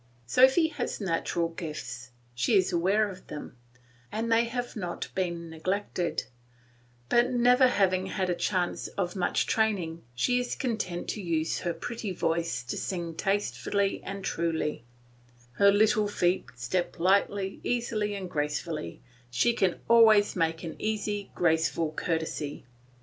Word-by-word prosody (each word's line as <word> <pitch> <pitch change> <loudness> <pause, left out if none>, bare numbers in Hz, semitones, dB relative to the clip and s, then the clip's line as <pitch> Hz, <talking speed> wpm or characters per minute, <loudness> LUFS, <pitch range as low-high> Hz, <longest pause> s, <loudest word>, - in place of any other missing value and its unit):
Sophy 265 - +5
has - - -4
natural 170 -3 -1
gifts; 150 -7 -6 0.2
she 125 - +1
is 185 -1 +2
aware 195 +5 +3
of 185 -2 -10
them, 150 - -8 0.6
and 230 +1 -2
they 230 +1 +4
have 245 +1 -4
not 180 -5 -4
been 170 -3 -2
neglected; 180 +2 -2 0.8
but 240 - +4
never 250 +1 +5
having 190 -5 +2
had 190 -1 -1
a 180 - +1
chance 180 0 -1
of 180 -2 -1
much 185 - +1
training 190 -7 0
she 245 - +2
is 245 0 -2
content 210 -8 -3
to 215 - -3
use 165 -3 -1
her 175 - -1
pretty 230 -4 -4
voice 165 -8 -1
to 120 - -4
sing 170 -3 -3
tastefully 200 +2 0
and 195 0 -6
truly; 160 -7 -1 0.7
her 200 +11 +5
little 210 +1 +3
feet 180 -2 +1
step 125 +10 -2
lightly, 195 +2 +2
easily, 220 -4 -1
and 190 -2 -5
gracefully, 150 - -3 0.3
she 125 - +2
can 190 -6 +1
always 220 -3 +6
make 165 -1 0
an 165 - -5
easy 210 -1 -2
graceful 160 -1 +1
courtesy. 160 -3 -3
185 Hz, 140 wpm, -28 LUFS, 165-215 Hz, 0.8 s, always